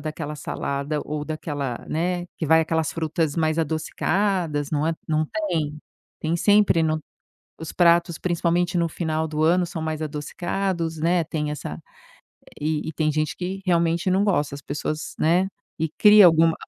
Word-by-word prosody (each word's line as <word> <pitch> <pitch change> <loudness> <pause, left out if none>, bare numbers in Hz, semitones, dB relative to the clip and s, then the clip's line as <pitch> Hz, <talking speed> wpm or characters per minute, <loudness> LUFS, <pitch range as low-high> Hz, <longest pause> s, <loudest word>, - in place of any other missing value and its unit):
daquela 150 0 -5
salada 140 +1 -3
ou 150 0 -4
daquela 145 -5 -4
né, 175 +2 -1
que - - -3
vai 160 +2 +5
aquelas 160 -1 0
frutas 160 -1 -1
mais 155 -1 +1
adocicadas, 160 0 0
não 150 0 0
é, 165 - +1
não 155 0 +2 0.2
tem? 150 -5 -2 0.4
Tem 160 +2 0
sempre 205 -3 +4
no 155 0 0 0.6
os 160 - -6
pratos, 170 -1 +3
principalmente, 175 0 0
no 170 -1 +1
final 160 -1 -2
do 155 0 -1
ano 175 +2 +3
são 165 -2 -5
mais 160 0 -3
adocicados, 165 +3 -3
né, 170 +2 +2
tem 150 -1 -2
essa 80 - -6 0.8
e 155 +1 -1
e - - -4
tem 155 0 0
gente 155 +1 -1
que 185 +2 -4
realmente 170 0 +2
não 190 +2 +3
gosta. 150 -8 +1
As 140 - -9
pessoas 150 +2 -4
né, 175 +4 +3 0.3
e 160 0 -1
cria 210 -1 +8
alguma 165 -1 +5
160 Hz, 160 wpm, -24 LUFS, 155-175 Hz, 0.8 s, cria